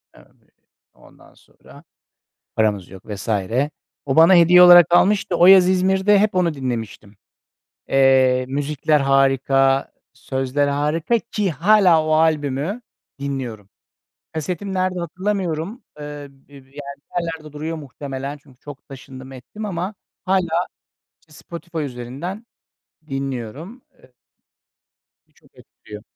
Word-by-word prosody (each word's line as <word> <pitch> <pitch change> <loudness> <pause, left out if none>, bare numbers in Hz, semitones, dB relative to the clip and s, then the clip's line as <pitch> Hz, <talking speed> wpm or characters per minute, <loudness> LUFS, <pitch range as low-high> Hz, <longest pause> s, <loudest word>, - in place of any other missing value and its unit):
Evet, - - -24 0.4
ondan - - -21
sonra - - -19 0.7
paramız 105 -4 0
yok 95 -1 -12
vs. 105 0 -7 0.8
O 135 - -1
bana 165 +4 +7
hediye 175 +1 +7
olarak 175 -2 +9
almıştı. 190 0 +2
O 175 - +5
yaz 185 -1 +7
İzmir'de 190 +2 +3
hep 210 0 +1
onu 175 -3 +1
dinlemiştim. 115 -6 -6 0.7
Eee, 130 -1 +3
müzikler 145 +2 0
harika, 135 0 +2 0.2
sözler 135 +2 -2
harika 155 +10 0
ki 210 -4 -3
hâlâ 175 +1 +4
o 155 - 0
albümü 155 - 0 0.4
dinliyorum. 125 -8 -5 0.7
Kasetim 180 +5 -4
nerede 185 -1 -1
hatırlamıyorum. 185 - -3 0.2
Eee, 145 -1 -8
bi 135 -1 -27
bi - - -20
yani 135 -1 -15 0.3
bir 140 - -35
yerlerde 160 -3 -7
duruyor 160 +2 -5
muhtemelen 140 -1 -7
çünkü 135 -2 -23
çok 145 -2 -12
taşındım 130 -1 -11
ettim 135 - -9
ama 190 +1 -4 0.3
hâlâ 180 -2 0 0.6
Spotify 170 +2 -9
üzerinden 140 - -7 0.6
dinliyorum. 135 - -6 0.2
E 130 - -21 1.2
Bir - - -36
çok - - -26
etkiliyor. 105 0 -13
150 Hz, 115 wpm, -20 LUFS, 135-180 Hz, 1.2 s, olarak